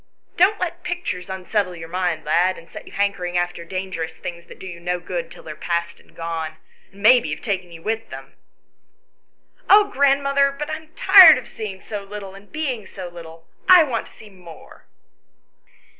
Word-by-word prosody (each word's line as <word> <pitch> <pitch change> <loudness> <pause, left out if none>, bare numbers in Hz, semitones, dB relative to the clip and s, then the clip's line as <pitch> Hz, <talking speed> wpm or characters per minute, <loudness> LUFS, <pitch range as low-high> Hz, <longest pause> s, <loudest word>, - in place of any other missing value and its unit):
Don't 395 +4 +3
let 350 0 -3
pictures 345 - -4
unsettle 190 0 -2
your 165 -1 -9
mind, 175 -2 -2
lad, 180 +5 +2
and 165 - -14
set - - -11
you - - -12
hankering 195 -3 -1
after 175 -1 -2
dangerous 185 -2 -5
things 170 +1 -8
that - - -13
do - - -11
you 175 -2 -8
no 180 +1 -2
good 175 -1 -5
till - - -14
they 155 - -8
are - - -8
past 170 +1 -3
and - - -24
gone, 165 -2 -4 0.3
and 200 +1 -15
maybe 245 +2 +6
have - - -5
taken 190 -5 -3
you 165 -1 -12
with 225 +1 -3
them." - - -10 1.4
"Oh, 410 0 +6
grandmother, 275 0 +2
but 295 +2 -4
I 310 - -2
am 315 0 -17
tired 365 -6 +9
of 255 - -8
seeing 210 -4 -7
so 205 +1 -6
little 200 -1 -8
and 195 +1 -15
being 265 -10 -3
so 185 -2 -8
little; 165 -1 -12 0.2
I 365 -2 +9
want 250 -6 -3
to - - -18
see 215 -1 -15
more." 175 -4 -15
190 Hz, 190 wpm, -22 LUFS, 170-255 Hz, 1.4 s, tired